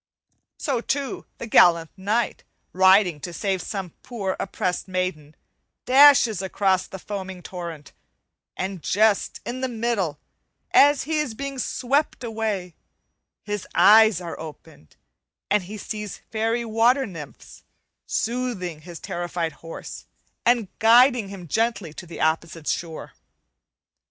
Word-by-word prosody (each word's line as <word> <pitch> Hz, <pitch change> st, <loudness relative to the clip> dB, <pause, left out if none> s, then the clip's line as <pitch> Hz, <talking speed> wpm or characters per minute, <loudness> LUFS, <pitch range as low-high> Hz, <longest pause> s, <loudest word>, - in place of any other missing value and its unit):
So, 265 Hz, -5 st, -1 dB
too, 275 Hz, +1 st, -3 dB
the -, -, -6 dB
gallant 170 Hz, -7 st, +5 dB
knight, 210 Hz, +5 st, -1 dB, 0.3 s
riding 190 Hz, -3 st, +5 dB
to 175 Hz, -, -6 dB
save 190 Hz, +1 st, -2 dB
some 190 Hz, -3 st, -5 dB
poor 200 Hz, -6 st, -3 dB
oppressed 185 Hz, -1 st, -2 dB
maiden, 185 Hz, -5 st, -3 dB, 0.5 s
dashes 255 Hz, -6 st, +6 dB
across 190 Hz, 0 st, +1 dB
the 190 Hz, -, -8 dB
foaming 190 Hz, -2 st, -7 dB
torrent; 170 Hz, -5 st, -7 dB, 0.7 s
and 190 Hz, -1 st, -4 dB
just 210 Hz, +3 st, +1 dB
in 255 Hz, +2 st, -4 dB
the 260 Hz, -, 0 dB
middle, 220 Hz, -, -2 dB, 0.5 s
as 290 Hz, 0 st, +5 dB
he 310 Hz, +1 st, -1 dB
is 275 Hz, -7 st, -2 dB
being 275 Hz, +1 st, -5 dB
swept 260 Hz, +3 st, -1 dB
away, 215 Hz, -6 st, -3 dB, 0.7 s
his 205 Hz, -2 st, -4 dB
eyes 220 Hz, -3 st, +7 dB
are 170 Hz, -2 st, -7 dB
opened, 155 Hz, -, -12 dB, 0.6 s
and 205 Hz, -3 st, +2 dB
he 210 Hz, +4 st, -7 dB
sees 210 Hz, -1 st, -6 dB
fairy 225 Hz, +2 st, 0 dB
water 235 Hz, +4 st, +3 dB
nymphs 160 Hz, -8 st, -11 dB, 0.5 s
soothing 220 Hz, -9 st, -2 dB
his 170 Hz, +1 st, -10 dB
terrified 175 Hz, -1 st, -3 dB
horse 165 Hz, 0 st, -10 dB, 0.4 s
and 235 Hz, -3 st, +3 dB
guiding 235 Hz, -1 st, +5 dB
him 190 Hz, -3 st, -9 dB
gently 220 Hz, -4 st, -1 dB
to 175 Hz, -, -9 dB
the 165 Hz, -, -9 dB
opposite 160 Hz, 0 st, -1 dB
shore. 165 Hz, -2 st, -4 dB
200 Hz, 125 wpm, -24 LUFS, 175-235 Hz, 0.7 s, eyes